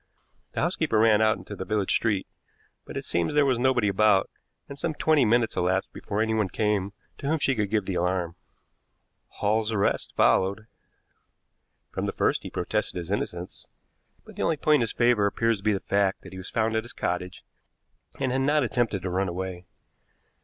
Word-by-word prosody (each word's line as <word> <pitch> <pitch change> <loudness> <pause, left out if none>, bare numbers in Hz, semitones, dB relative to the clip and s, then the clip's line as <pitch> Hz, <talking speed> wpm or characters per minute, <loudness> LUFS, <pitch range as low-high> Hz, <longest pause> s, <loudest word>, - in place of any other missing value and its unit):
The - - -1
housekeeper 110 - 0
ran 110 -1 +5
out 110 0 +3
into 105 - -9
the 95 - -5
village 105 -1 0
street, 105 -5 0 0.6
but - - -7
it - - -4
seems 85 - -1
there 150 -1 +5
was 130 -3 +1
nobody 125 -4 +2
about, 100 0 +3 0.4
and 140 - -8
some 155 +1 -2
twenty 155 -4 +3
minutes 115 +1 +2
elapsed 95 +2 0
before 105 +2 -2
anyone 110 -3 0
came 105 -2 0 0.3
to 140 - -4
whom 160 +2 +2
she 140 -2 +1
could 105 -5 -1
give 105 -2 0
the 95 - -3
alarm. 90 -1 -1 0.9
"Hall's 110 +2 0
arrest 100 -2 0
followed. 100 +3 +2 1.3
From - - -3
the - - -2
first - - +1
he - - -7
protested - - -2
his 85 +1 -5
innocence, 90 -3 -4 0.6
but - - -13
the - - -5
only 160 - +1
point 150 +1 +4
in - - -1
his 115 - -1
favor 120 -4 +3
appears 115 +2 +1
to 100 - -15
be 105 - +3
the 100 - -1
fact 100 -1 0
that - - -12
he - - -8
was 95 - -8
found 110 0 0
at 110 - 0
his 120 - -10
cottage, 90 +1 -3 0.8
and 135 -2 0
had 130 +1 0
not 145 +2 +3
attempted 115 -5 -1
to 95 - -2
run 95 +1 0
away. 90 0 -5
105 Hz, 195 wpm, -26 LUFS, 95-120 Hz, 1.3 s, ran